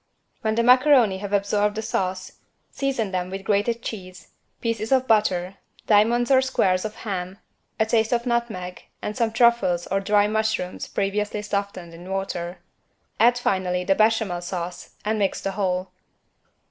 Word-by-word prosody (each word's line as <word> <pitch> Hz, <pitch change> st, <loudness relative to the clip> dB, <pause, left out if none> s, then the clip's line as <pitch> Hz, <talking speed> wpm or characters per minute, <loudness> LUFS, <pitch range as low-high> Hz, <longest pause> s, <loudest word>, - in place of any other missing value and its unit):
When 220 Hz, -2 st, 0 dB
the 235 Hz, -, +2 dB
macaroni 250 Hz, -5 st, +5 dB
have 200 Hz, 0 st, -6 dB
absorbed 205 Hz, +1 st, +1 dB
the 220 Hz, -, -3 dB
sauce, 185 Hz, -3 st, -3 dB, 0.3 s
season 260 Hz, -7 st, -2 dB
them 180 Hz, -1 st, -2 dB
with 195 Hz, +1 st, -6 dB
grated 210 Hz, +4 st, 0 dB
cheese, 185 Hz, -4 st, -8 dB, 0.3 s
pieces 225 Hz, -1 st, -2 dB
of 260 Hz, -1 st, +4 dB
butter, 195 Hz, -4 st, +1 dB, 0.3 s
diamonds 235 Hz, +4 st, +3 dB
or 260 Hz, -1 st, +6 dB
squares 190 Hz, -7 st, +1 dB
of 215 Hz, 0 st, -5 dB
ham, 185 Hz, -2 st, -4 dB, 0.4 s
a 220 Hz, -, +4 dB
taste 220 Hz, 0 st, +1 dB
of 240 Hz, 0 st, +1 dB
nutmeg 225 Hz, -7 st, -2 dB, 0.2 s
and 210 Hz, -, -3 dB
some 230 Hz, -3 st, 0 dB
truffles 225 Hz, -7 st, +3 dB
or 195 Hz, -, 0 dB
dry 205 Hz, +1 st, +3 dB
mushrooms 220 Hz, -4 st, -1 dB
previously 205 Hz, +1 st, -2 dB
softened 200 Hz, -4 st, -4 dB
in 175 Hz, +2 st, -11 dB
water. 190 Hz, -2 st, -3 dB, 0.6 s
Add 240 Hz, +2 st, +5 dB
finally 185 Hz, -6 st, 0 dB
the 195 Hz, -, +3 dB
Béchamel 215 Hz, -4 st, +1 dB
sauce 175 Hz, 0 st, -6 dB
and 215 Hz, 0 st, 0 dB
mix 195 Hz, -2 st, 0 dB
the 195 Hz, -, -3 dB
whole. 190 Hz, -2 st, -2 dB
205 Hz, 155 wpm, -24 LUFS, 185-225 Hz, 0.6 s, or